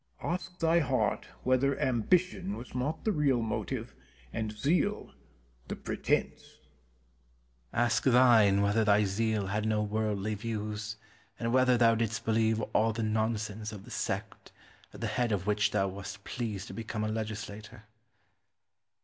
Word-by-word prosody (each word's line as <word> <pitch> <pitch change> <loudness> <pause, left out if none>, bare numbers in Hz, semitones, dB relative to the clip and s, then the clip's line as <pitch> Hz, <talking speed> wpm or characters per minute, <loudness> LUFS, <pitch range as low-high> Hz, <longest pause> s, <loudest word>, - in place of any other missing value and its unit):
Penn. - - -2
Ask 180 0 -4
thy 165 0 +3
heart 135 -5 0 0.2
whether 130 +2 +2
ambition 180 - +1
was 125 - -10
not 130 +5 -2
thy 220 - +3
real 145 -8 +2
motive 110 - -3 0.4
and 110 -1 -2
zeal 165 - 0 0.5
the - - -4
pretence? - - -1
Cortez. - - -20 1.1
Ask 120 -1 +1
thine 115 -6 +6
whether 100 +2 +3
thy 105 0 +4
zeal 105 +1 0
had 105 +3 -1
no 105 -1 +1
worldly 105 -1 -1
views 105 -1 -4 0.4
and 115 0 -1
whether 130 -1 +5
thou 115 -1 +5
didst 110 -1 -1
believe 110 0 +2
all 110 +1 +3
the 115 +1 -2
nonsense 110 -1 -1
of 100 -3 -9
the - - -12
sect, - - -4 0.4
at - - -12
the - - -1
head 120 -3 0
of 95 -3 -1
which 105 0 +2
thou 100 -2 +1
wast 95 +1 -7
pleased 105 -5 -4
to - - -7
become 110 -1 -4
a - - 0
legislator. 110 0 -5
110 Hz, 150 wpm, -30 LUFS, 105-125 Hz, 1.1 s, thine